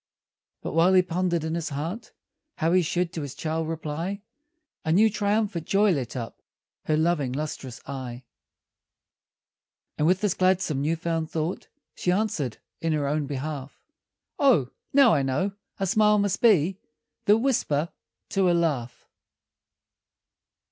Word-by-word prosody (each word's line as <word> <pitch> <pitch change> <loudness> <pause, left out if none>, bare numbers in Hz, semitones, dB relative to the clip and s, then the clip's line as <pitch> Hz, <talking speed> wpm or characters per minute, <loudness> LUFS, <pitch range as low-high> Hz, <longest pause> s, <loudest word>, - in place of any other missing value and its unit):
But - - -4
while 170 +4 +4
he 185 - +6
pondered 175 -1 -1
in 160 0 -2
his 165 -1 -2
heart 165 +11 -5 0.4
How 165 0 +1
he 185 - +5
should 175 +1 -1
to 165 - -4
his 140 -2 -6
child 160 0 -2
reply, 165 +5 -4 0.6
A 160 - 0
new, 215 +6 +5
triumphant 205 -4 0
joy 200 +1 +4
lit 135 -8 -2
up 115 -3 -6 0.4
Her 155 - +2
loving, 155 -5 +1
lustrous 135 -4 -5
eye; 130 -2 -6 1.8
And 150 - +3
with 185 +2 +3
this 205 -4 +2
gladsome, 185 -6 +1
new 155 +3 +1
found 165 -1 -2
thought, 160 +2 -3 0.3
She 180 - -1
answered 180 - -1 0.2
in 165 -2 0
her 145 -2 0
own 150 0 -1
behalf: 140 0 -5 0.6
"Oh, 165 - +4 0.2
now, 270 -4 +6
I 145 - +3
know; 135 +9 0 0.3
a 195 - +1
smile 210 +2 +4
must 200 -1 0
be 190 -5 +4 0.5
_The 210 +2 +6
whisper 170 - +1 0.4
to 195 -2 +2
a - - +4
laugh! 140 -8 -2
165 Hz, 145 wpm, -26 LUFS, 150-190 Hz, 1.8 s, he